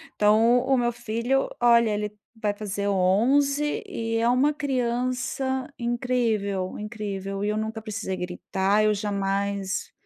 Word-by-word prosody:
Então, 220 +4 +4
o 260 +1 +2
meu 240 -1 +1
filho, 240 +3 -1
olha, 235 -1 +5
ele 210 0 -3 0.2
vai 210 -2 0
fazer 205 -1 -3
11 265 +10 +2
e 225 0 -2
é 230 +1 +2
uma 265 +5 +3
criança 255 0 -1
incrível, 230 -6 -1
incrível, 200 -2 -4
e 210 - 0
eu 210 - -1
nunca 220 +1 -3
precisei 210 -3 -4
gritar. 190 +3 0
Eu 215 - +4
jamais 200 -1 -2
220 Hz, 130 wpm, -25 LUFS, 200-245 Hz, 0.2 s, olha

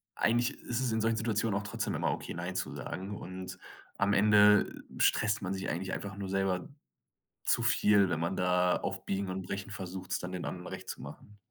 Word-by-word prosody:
eigentlich 120 +4 +2
ist 120 0 -2
es 125 - +1
in 110 0 +1
solchen 115 0 +2
Situationen 110 -2 0
auch - - -7
trotzdem 100 - -2
immer - - +1
okay, - - -4
nein 90 +2 -4
zu 95 - -2
sagen 100 +2 -5
und 95 0 -7 0.4
am 100 0 +2
Ende 105 0 +5 0.2
stresst 110 -1 +3
man 95 0 -2
sich 95 0 -3
eigentlich 90 +4 -2
einfach 100 -1 -4
nur 100 -1 -4
selber 95 -2 0 0.8
zu - - +3
viel, 100 -2 +4
wenn 85 -2 0
man 85 +3 -1
da 90 0 +3
auf - - -3
Biegen 100 0 -1
und 95 0 -3
Brechen 100 +2 -5
versucht, 95 -1 -6
es 95 - +2
dann 90 0 -5
den 90 -1 -4
anderen 90 0 -5
Recht - - -7
zu - - -5
machen. 105 0 -11
95 Hz, 210 wpm, -31 LUFS, 90-105 Hz, 0.8 s, Ende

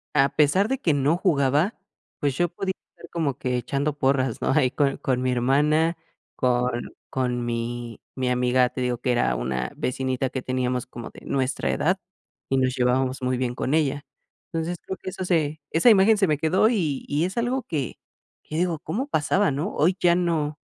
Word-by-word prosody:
a 140 0 +5
pesar 155 +8 +4
de 265 - 0
que 165 - +2
no 145 +4 +2
jugaba, 150 - +2 0.4
pues, 140 -3 0
yo 175 -1 +2
podía 190 +2 -3 0.2
estar 170 - -14
como 150 -6 -1
que 125 -2 -1
echando 140 +4 -2
porras, 130 -3 +1
¿no? - - +1
Ahí 130 -4 +3
con 140 0 +1
con 125 -1 -1
mi 130 0 +1
hermana, 150 +7 +2 0.4
con 125 -1 0 0.2
con 125 -2 -1
mi 120 0 -4 0.2
mi 130 -1 -1
amiga, 125 0 +3
te 130 - -5
digo 125 -1 0
que 125 0 +1
era 60 - +2
una 65 +1 -2
vecinita 130 0 -1
que 130 - -4
teníamos 125 -1 -1
como 120 -2 -8
de - - -14
nuestra 130 0 0
edad 185 +4 +1 0.5
y 135 - +2
nos 130 0 +1
llevábamos 130 +1 +1
muy 125 0 0
bien 125 -1 -2
con 135 - -1
ella. 145 -2 0 0.5
Entonces 165 +2 -2
creo 190 - -5
que - - -4
eso 185 - -5
se 155 -3 0
esa 170 +9 +5
imagen 210 +2 +5
se 195 -2 +3
me 150 -2 +2
quedó, 185 +8 +3
y 160 - -1
y 150 +4 +1
es 190 +5 -5
algo 245 +2 0
que 150 - -3 0.5
que 155 - -5
digo: 170 -3 0
“¿Cómo 250 - -3
pasaba", 190 - +2
¿no?. 150 +9 -2
Hoy 180 +4 +3
ya 175 -1 +4
no, 160 -4 0
140 Hz, 195 wpm, -24 LUFS, 125-170 Hz, 0.5 s, a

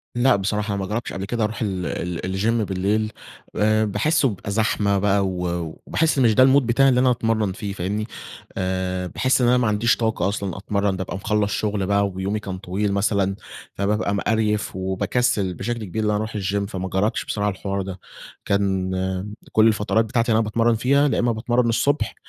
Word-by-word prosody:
لأ، 125 -1 +4
بصراحة 105 +1 -1
أنا 100 - -2
ما - - -4
جربش 115 +2 -3
قبل 95 +1 -4
كده 115 +1 -1
أروح 105 +3 -2
ال 95 -4 -2
ال 85 0 -3
الجيم 110 +5 0
بالليل، 105 +3 0 0.4
آآ 110 +1 +3
باحسّه 130 +8 +2
بيبقى 100 0 -6
زحمة 100 -2 +1
بقى 100 0 +2
و 90 -1 -3 0.4
وباحس 160 -3 +1
مش 115 -4 +4
ده 130 - +7
المود 135 -1 +5
بتاعي 135 +3 +4
اللي 125 -1 +3
أنا 130 0 +4
أتمرّن 110 -4 0
فيه، 100 +1 -5
فاهمني؟ 100 +4 -3 0.5
آآ، 95 -1 -2
باحس 130 +6 +1
إن 120 - +3
أنا 125 +1 +4
ما 120 -3 +2
عنديش 105 +3 +2
طاقة 110 -5 0
أصلًا 100 -3 -3
أتمرّن، 100 0 -1
بابقى 95 0 -4
خلص 105 0 +1
شغل 105 -2 -1
بقى 100 0 +2
ويومي 95 +3 -3
كان 95 -2 -6
طويل 100 +2 -2
مثلًا، 100 -1 +1 0.4
فبابقى 100 0 0
مقريف 105 -1 0
وباكسل 100 +2 0
بشكل 115 +4 -4
كبير 110 +4 -3
إن 105 - +1
أنا 105 - +1
أروح 110 +1 -4
الجيم 100 0 -1
فما 95 -1 -5
جربش 100 +4 0
بسرعة 105 0 -1
الحوار 100 0 -3
ده، 95 -1 -6 0.5
كان 95 -2 0 0.6
كل 110 +1 +5
الفترات 110 +1 +2
بتاعتي 115 +1 0
اللي 110 - +4
أنا - - +2
باتمرّن 115 +2 +2
فيها 140 +5 +3
يا - - 0
إما 120 -1 +2
باتمرّن 120 +1 +1
الصبح، 140 +6 +1
105 Hz, 190 wpm, -22 LUFS, 95-115 Hz, 0.6 s, ده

